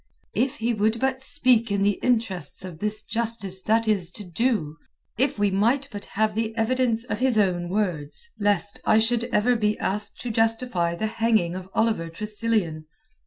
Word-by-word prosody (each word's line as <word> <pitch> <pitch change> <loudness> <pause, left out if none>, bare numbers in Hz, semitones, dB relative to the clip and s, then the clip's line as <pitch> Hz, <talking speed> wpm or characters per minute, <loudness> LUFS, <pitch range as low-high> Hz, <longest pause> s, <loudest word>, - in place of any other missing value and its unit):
"If 260 0 0
he 235 +1 0
would 220 +2 +1
but 265 +1 0
speak 250 -5 +2
in 200 -1 +1
the 205 0 +1
interests 220 -8 -1
of 175 -4 -9
this 210 +2 0
justice 225 -5 -2
that 225 +3 +2
is 195 -5 +2
to 210 - -7
do! 180 - -1 0.4
If 270 +2 +1
we 205 -1 +2
might 240 +8 +1
but 205 -2 -7
have 215 +1 0
the 225 +1 -2
evidence 230 0 +1
of 250 - -4
his 255 -3 +2
own 180 -4 +1
words, 180 - -2
lest 205 -1 +1
I 215 - +4
should 230 +1 +2
ever 245 0 +2
be 210 -2 +1
asked 205 +2 -2
to 245 - -3
justify 225 -6 +1
the 215 - -2
hanging 220 -5 +1
of 185 0 -7
Oliver 220 -7 +1
Tressilian." 205 -4 -2
215 Hz, 175 wpm, -25 LUFS, 195-230 Hz, 0.4 s, I